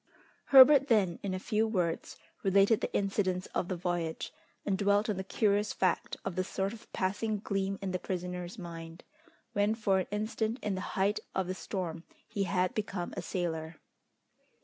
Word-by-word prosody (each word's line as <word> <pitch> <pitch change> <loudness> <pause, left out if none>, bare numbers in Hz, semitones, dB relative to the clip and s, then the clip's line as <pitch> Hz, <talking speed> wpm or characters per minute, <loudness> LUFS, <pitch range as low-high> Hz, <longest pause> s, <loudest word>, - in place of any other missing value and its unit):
Herbert 275 +1 +8
then 200 -8 +3
in 190 -2 -2
a - - -3
few 215 +3 +1
words 180 -6 -1 0.2
related 200 +3 +4
the - - -2
incidents 195 -2 0
of 175 - 0
the 185 - -2
voyage, 170 -2 -2 0.3
and 195 - +1
dwelt 205 +2 +2
on 200 - -3
the 190 - -2
curious 205 +1 +1
fact 185 - 0
of 195 -3 -3
the 185 - +1
sort 195 +2 -2
of 230 - -13
passing 210 +3 -1
gleam 195 -1 -2
in 190 - -2
the 185 - -1
prisoner's 180 +1 -4
mind, 165 -2 -8 0.5
when 205 +2 +2
for 200 -4 +2
an 185 - -2
instant 220 +2 -1
in 210 - 0
the 185 - -3 0.2
height 200 +2 +2 0.2
of 190 - +1
the 185 - -2
storm 175 -4 -4 0.2
he 200 -3 -1
had 185 -1 +1
become 200 -4 -3
a - - -3
sailor. 160 -3 -3
195 Hz, 175 wpm, -31 LUFS, 180-210 Hz, 0.5 s, Herbert